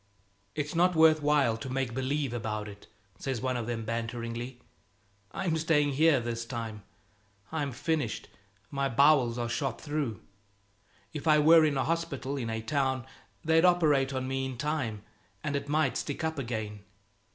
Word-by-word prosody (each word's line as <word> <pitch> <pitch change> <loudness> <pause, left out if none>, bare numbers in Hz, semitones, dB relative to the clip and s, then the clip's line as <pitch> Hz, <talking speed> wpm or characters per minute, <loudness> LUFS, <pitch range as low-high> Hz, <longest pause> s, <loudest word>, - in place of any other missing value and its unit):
"It's 150 +2 -2
not 180 +1 +3
worth 160 -1 +6
while 145 -6 +3
to 130 - -6
make 130 -2 -2
believe 135 +1 -1
about 110 -2 -3
it," 100 -1 -12 0.3
says 135 -4 -2
one 130 +1 -1
of 120 -2 -3
them 115 -2 -3
banteringly. 115 +2 -4 0.7
"I'm 185 -4 -1
staying 150 -2 +2
here 150 0 +4
this 115 -1 -3
time. 115 -3 -5 0.7
It's 145 -6 -2
finished 155 -8 -1 0.4
my 140 -1 0
bowels 130 -2 +4
are 120 -1 -1
shot 120 0 -2
through. 145 - -3 0.9
If 150 +1 -5
I 155 -1 +6
were 160 +2 +7
in 150 -3 +2
a 135 - +2
hospital, 145 -5 -2
in 120 -5 -3
a 110 0 -3
town, 130 0 0 0.4
they'd 160 +1 +4
operate 155 -7 +4
on 130 -1 -2
me 135 0 -1
in 130 -2 -6
time, 130 -7 -2 0.4
and 145 -1 -1
it 140 0 -3
might 150 -3 +1
stick 145 - -4
up 160 -2 -1
again. 110 -4 -4
135 Hz, 165 wpm, -29 LUFS, 115-150 Hz, 0.9 s, were